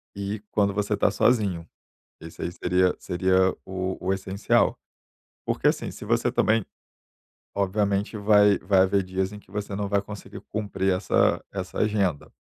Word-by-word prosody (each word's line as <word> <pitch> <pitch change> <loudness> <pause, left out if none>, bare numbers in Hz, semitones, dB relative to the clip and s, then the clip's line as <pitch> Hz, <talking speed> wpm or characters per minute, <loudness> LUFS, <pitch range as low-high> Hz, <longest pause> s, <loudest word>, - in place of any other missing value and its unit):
e 100 +1 -4
quando 100 -2 +2
você 105 +1 -1
está 100 - +2
sozinho, 100 -7 +1 0.5
esse 80 0 -10
aí 85 - -2
seria 90 +1 +1
seria 95 +1 +2
o 95 0 -3
o 95 - +1
essencial. 95 +1 +1 0.7
Porque, - - +1
assim, - - -1
se - - -10
você - - +1
também 110 -1 +2 0.9
obviamente 100 +1 0
vai 105 -1 +5
vai 95 0 +2
haver 95 +1 +2
dias 95 +1 -2
em 105 - -8
que - - -23
você 100 -1 -4
não 100 0 -2
vai 100 0 +2
conseguir 100 0 -9
cumprir 100 -3 -1
essa 95 +1 +2
essa 95 -2 -5
agenda. 100 -8 0
100 Hz, 155 wpm, -25 LUFS, 95-105 Hz, 0.9 s, vai